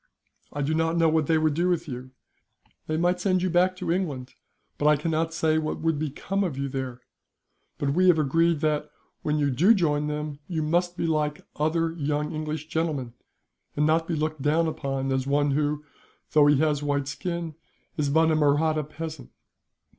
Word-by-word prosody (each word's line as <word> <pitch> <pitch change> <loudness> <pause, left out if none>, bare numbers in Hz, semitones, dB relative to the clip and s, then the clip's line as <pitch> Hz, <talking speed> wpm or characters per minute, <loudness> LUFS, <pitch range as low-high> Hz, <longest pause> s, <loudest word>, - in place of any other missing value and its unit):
I 145 - -3
do 150 +3 0
not 165 +1 +1
know 165 -1 +4
what 155 -2 +1
they 160 - +3
would 155 -1 +2
do 175 +4 +1
with 170 -1 0
you. 130 -1 -6 0.8
They 155 - -1
might 175 +2 +1
send 185 -1 +1
you 185 - 0
back 180 +2 +3
to 185 -2 -3
England, 145 -9 -2 0.5
but 145 - +2
I 150 - +6
cannot 160 +2 -1
say 160 -1 +1
what 155 -1 -3
would 160 -2 +1
become 155 +7 -2
of 165 -8 -3
you 140 0 -2
there; 130 -2 -5 0.8
but 140 -1 0
we 185 +3 +3
have 175 -3 +6
agreed 165 +2 +2
that, 150 -1 0 0.3
when 150 0 0
you 145 -2 +1
do 180 - +5
join 150 -5 +1
them, 150 -1 -4
you 160 -4 -2
must 175 +3 0
be - - -1
like 150 -2 -1
other 160 +2 +1
young 150 -1 -2
English 155 0 -4
gentlemen, 150 -7 -2 0.6
and 150 - +2
not 160 +1 +2
be 170 - -1
looked 155 -1 -2
down 155 +4 +2
upon 135 -4 -2
as 130 0 0
one 145 +1 +2
who, 150 +1 0 0.5
though 150 -1 +5
he 145 -1 +5
has 150 -1 +1
a - - -4
white 140 -1 0
skin, 170 +1 -4 0.4
is 145 -2 0
but 160 +2 +4
a - - +3
Mahratta 155 +1 +2
peasant. 155 -2 -7
155 Hz, 195 wpm, -26 LUFS, 145-165 Hz, 0.8 s, I